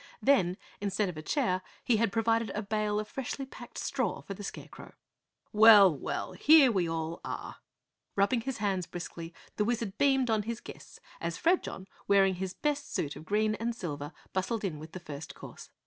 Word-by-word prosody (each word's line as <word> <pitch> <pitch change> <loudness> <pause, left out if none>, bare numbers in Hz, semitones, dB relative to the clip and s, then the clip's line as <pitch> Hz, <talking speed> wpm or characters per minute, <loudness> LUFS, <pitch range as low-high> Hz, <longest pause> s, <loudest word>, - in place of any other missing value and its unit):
Then, 185 -10 +3 0.2
instead 200 0 0
of 170 - -7
a - - -5
chair, 185 - 0 0.2
he 235 - +3
had 225 -2 +1
provided 225 +1 +1
a 210 - -2
bale 210 0 0
of 215 - -4
freshly 270 +3 -4
packed 265 - -11
straw - - -1
for 195 - -6
the 205 - -9
Scarecrow. - - -9 0.6
"Well, 210 -5 +8
well, 135 - -4
here 275 - +6
we 180 -6 0
all 165 0 -3
are!" - - -6 0.6
Rubbing 205 +5 +2
his 265 +1 -4
hands 195 -4 -1
briskly 170 -1 -7 0.3
the 210 - +2
Wizard 225 -3 -2
beamed 270 -4 +3
on 215 -1 +2
his 230 +2 -4
guests - - -12 0.2
as 170 0 -3
Fredjon, 335 - 0 0.2
wearing 195 -1 +5
his 185 0 -4
best 290 -1 -2
suit 145 - -2
of 155 - -10
green 215 +2 +1
and 230 +2 -2
silver, 145 -7 -5 0.2
bustled 200 +4 -1
in 165 -7 -3
with 160 +1 -10
the 185 - -6
first 150 -3 -8
course. - - -11
205 Hz, 185 wpm, -30 LUFS, 180-230 Hz, 0.6 s, Well